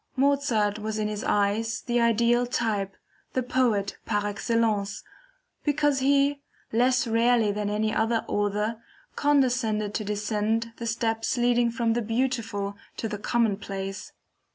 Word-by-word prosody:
Mozart 260 -7 +2
was 215 0 -3
in 215 -1 0
his 210 0 -4
eyes 210 +3 +1
the 240 -1 0
ideal 235 +1 +3
type, 210 -6 -1 0.4
the 255 - 0
Poet 235 -6 +1
par 205 -2 -1
excellence, 205 -1 0 0.6
because 290 -1 +2
he, 280 +1 +2 0.3
less 250 +3 +3
rarely 230 -1 +3
than 205 0 -2
any 215 +1 0
other 225 +1 +1
author, 210 +2 -1 0.3
condescended 245 -7 +1
to 215 - -2
descend 210 +2 -1
the 235 - -5
steps 225 +1 -1
leading 240 0 +3
from 230 -1 0
the 240 - 0
beautiful 225 -3 -1 0.2
to 225 - -2
the 210 -1 -5
commonplace. 195 -4 -2
225 Hz, 130 wpm, -26 LUFS, 210-245 Hz, 0.6 s, ideal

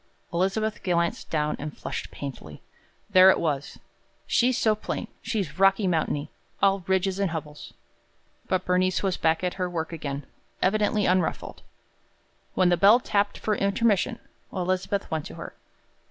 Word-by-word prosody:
Elizabeth 200 +5 0
glanced 170 -2 -1
down 150 -1 0
and 150 0 -6
flushed - - -5
painfully. 130 - -8 0.5
There 185 -1 +8
it - - +4
was: 145 -3 -2 0.5
"She's 250 0 +2
so 220 - +3
plain. 215 - -5
She's 205 -7 -3
Rocky 195 +1 +4
Mountainy 155 -4 -1 0.3
all 195 -1 +3
ridges 190 0 +1
and 200 -2 +1
hubbles." 150 -2 -7 0.7
But 185 0 0
Bernice 185 +1 +1
was 190 -2 +1
back 160 +1 +1
at 180 - 0
her 180 - 0
work 165 -1 -4
again, 140 -3 -5 0.3
evidently 210 +1 +2
unruffled. 180 -2 0 0.9
When 185 -1 +4
the 175 - +3
bell 205 +6 +7
tapped 205 -4 0
for 215 - -1
intermission, 200 +1 +1 0.3
Elizabeth 185 +2 -1
went 160 -2 -2
to - - -10
her. - - -8
185 Hz, 145 wpm, -26 LUFS, 160-200 Hz, 0.9 s, There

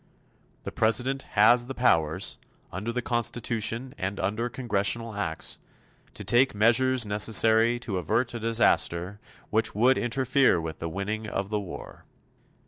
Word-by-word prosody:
The - - -6
President 125 +5 +1 0.2
has 120 +3 +5
the 135 - -6
powers, 80 -11 +1 0.3
under 105 +5 -4
the 125 0 -3
Constitution 120 +1 -2
and 100 +1 -4
under 105 +5 -2
Congressional 115 -1 -1
Acts, 80 -6 -2 0.6
to - - -7
take 125 0 +2
measures 120 +3 +3
necessary 110 +3 +3
to 110 -6 -4
avert 120 - -1
a 120 - -5
disaster 105 -4 +1 0.3
which 110 -1 0
would 125 +5 +3
interfere 130 -3 +2
with 80 -1 -6
the 85 - -4
winning 105 +5 -4
of 100 -1 -4
the 105 - 0
war. 100 -3 -10
115 Hz, 135 wpm, -26 LUFS, 100-120 Hz, 0.6 s, has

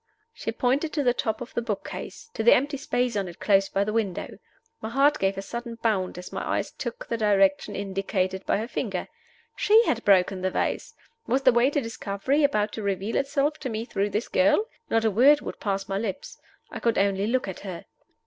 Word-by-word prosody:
She 225 - -4
pointed 265 +7 0
to 295 - 0
the 245 -2 +3
top 220 -2 -2
of 245 - -7
the - - -1
book 215 -4 -3
case 455 -2 -8
to - - -3
the - - +7
empty 285 +2 0
space 250 -4 -1
on 200 -2 -1
it 175 - -10
close 195 -2 +3
by 200 - +1
the 210 +1 -3
window. 210 -5 -2 0.4
My 220 - -4
heart 280 +5 +3
gave 195 0 0
a 195 - -4
sudden 235 +2 -6
bound 215 -6 -1
as 180 - -9
my - - -3
eyes - - -1
took 240 -2 -6
the 230 - -2
direction 195 -2 +2
indicated 190 -1 -2
by - - +2
her 220 +3 -3
finger. - - -3 0.5
She 440 +3 +5
had 235 -1 0
broken 190 -1 +3
the 185 - +1
vase! 460 - -2 0.3
Was 265 +3 +1
the 260 - +7
way 240 +3 +4
to 290 0 0
discovery 230 +5 -1
about 215 -7 +2
to 220 - -6
reveal 200 +2 -2
itself 280 +2 0
to 260 - -4
me 225 0 -3
through 200 -3 -1
this 210 +4 -2
girl? 300 +9 +3 0.2
Not 225 0 +2
a 220 - +3
word 275 +8 +5
would - - -7
pass 195 -1 -2
my 195 0 -1
lips; 200 -4 -5 0.3
I - - -5
could 230 -1 +1
only 200 0 +1
look 255 0 0
at 190 - -6
her. 185 -4 -7
225 Hz, 220 wpm, -26 LUFS, 195-260 Hz, 0.5 s, the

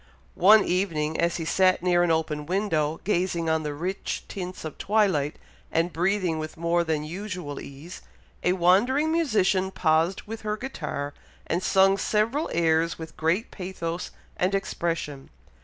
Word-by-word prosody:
One 205 +3 +7
evening, 160 -4 0
as 170 0 +1
he 165 - -4
sat 185 +2 +3
near 175 -1 +3
an 175 - +2
open 155 -2 -1
window, 165 -5 0
gazing 175 -4 0
on 160 0 +1
the 150 -1 -4
rich 185 +6 -3
tints 180 -3 -6
of 155 - -7
twilight, 190 -9 +1 0.4
and 165 +2 +1
breathing 180 -1 0
with 155 +1 -6
more 170 +1 +1
than 160 -2 -1
usual 180 -3 -5
ease, 145 +6 -10 0.4
a 180 - +3
wandering 220 - +3
musician 205 - +2
paused 165 0 +1
with 225 +1 -7
her 210 0 -2
guitar, 150 - -4 0.3
and 170 - -1
sung 195 +1 +4
several 230 +9 0
airs 165 0 +2
with 160 -1 -9
great 170 +7 0
pathos 180 -2 -5 0.3
and 185 +2 +1
expression. 165 -7 -3
175 Hz, 150 wpm, -26 LUFS, 160-195 Hz, 0.4 s, One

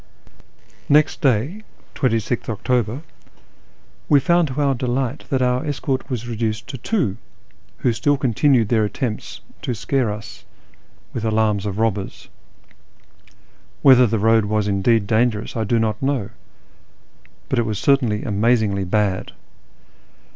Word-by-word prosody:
Next 150 +1 +3
day 135 - +1 0.3
(2Gth 115 -3 -1
October) 120 +4 -1 1.1
we 145 - +6
found 170 +2 +2
to 135 +1 -5
our 140 -2 +2
delight 125 0 -2
that 130 -2 +1
our 125 0 +1
escort 135 -2 -3
was 120 -3 -4
reduced 110 -2 -2
to 135 -3 -6
two, 155 - -1 0.6
who 125 - +1
still 140 +6 +1
continued 130 -2 +2
their 110 -2 +3
attempts 110 +2 -4 0.2
to 125 - -3
scare 125 0 0
us 105 +1 -9 0.7
with 115 - -4
alarms 110 -2 +1
of 100 -1 -4
robbers. 105 -3 -2 1.5
Whether 125 -3 +7
the 110 +1 0
road 110 +1 +3
was 105 0 0
indeed 100 +2 +2
dangerous 110 0 0
I 110 -1 -1
do 115 +3 +1
not 110 -1 -1
know, 135 -7 -1 1.2
but 130 - 0
it 115 - +1
was 105 -2 -2
certainly 125 -5 +2
amazingly 105 -2 +1
bad. 95 0 -1
115 Hz, 130 wpm, -21 LUFS, 105-130 Hz, 1.5 s, Whether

